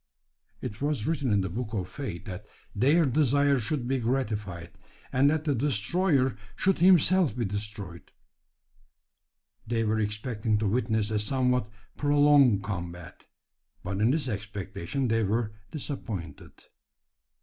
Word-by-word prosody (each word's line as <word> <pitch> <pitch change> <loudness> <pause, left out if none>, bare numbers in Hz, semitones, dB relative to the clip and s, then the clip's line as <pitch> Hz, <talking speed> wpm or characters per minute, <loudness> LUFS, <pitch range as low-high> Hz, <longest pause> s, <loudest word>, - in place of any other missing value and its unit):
It 105 +4 -6
was 145 -6 -1
written 145 -7 0
in 100 -1 +3
the 95 - -2
book 115 +2 -4
of 95 -3 -2
fate 90 - -6
that 95 +2 -7 0.3
their 145 +10 +4
desire 140 0 +3
should 125 +2 -2
be 135 0 0
gratified, 105 -8 -2 0.4
and 135 +2 +4
that 155 0 0
the 150 -2 +1
destroyer 135 - +1 0.2
should 190 -1 +1
himself 180 - +5
be 120 - 0
destroyed. 100 -3 -6 1.6
They 115 0 0
were 110 0 +1
expecting 105 +1 -1
to 105 0 0
witness 110 -1 0
a 105 - +1
somewhat 125 0 +1 0.3
prolonged 145 -7 +4
combat; 90 -4 -6 0.6
but 95 0 -3
in 110 - +4
this 145 +1 +1
expectation 100 +2 -4
they 115 0 +2
were 105 +1 -1 0.2
disappointed. 110 - -6
115 Hz, 130 wpm, -28 LUFS, 105-140 Hz, 1.6 s, himself